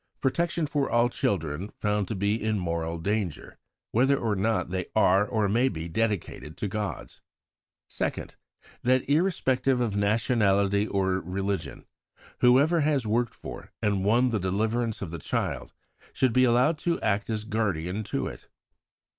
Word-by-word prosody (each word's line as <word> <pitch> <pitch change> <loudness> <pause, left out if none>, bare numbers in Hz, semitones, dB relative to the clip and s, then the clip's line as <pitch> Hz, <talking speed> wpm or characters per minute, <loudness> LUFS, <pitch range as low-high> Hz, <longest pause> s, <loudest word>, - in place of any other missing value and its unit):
Protection 170 +4 0
for 145 -1 -1
all 120 +1 +3
children 85 -4 -2
found 105 -2 0
to 110 - -3
be 100 +2 +1
in 110 -1 +1
moral 85 -2 -2
danger, 95 -1 -3 0.3
whether 135 +4 +3
or 110 -5 0
not 110 -2 0
they 90 -1 -2
are 100 -1 +4
or 110 -3 +1
may 120 +6 +2
be 80 -4 -5
dedicated 100 -5 -2
to 105 - -2
gods. 105 +1 -5 0.7
2nd. - - -3 0.5
That, 130 +1 +2
irrespective 135 -5 +2
of 115 -5 0
nationality 100 -1 +2
or 95 -2 0
religion, 95 +2 -4 0.5
whoever 140 +7 +5
has 145 -4 +1
worked 115 +2 0
for - - -9
and 100 -2 0
won 120 +5 +3
the 110 -3 0
deliverance 110 +4 -1
of 85 - -6
the 85 - -5
child - - -3 0.4
should 130 -3 +1
be 130 +1 +5
allowed 125 +6 +3
to 170 0 0
act 105 0 0
as 110 -1 -2
guardian 100 -4 -1
to - - -2
it. - - -8
110 Hz, 150 wpm, -27 LUFS, 95-125 Hz, 0.7 s, whoever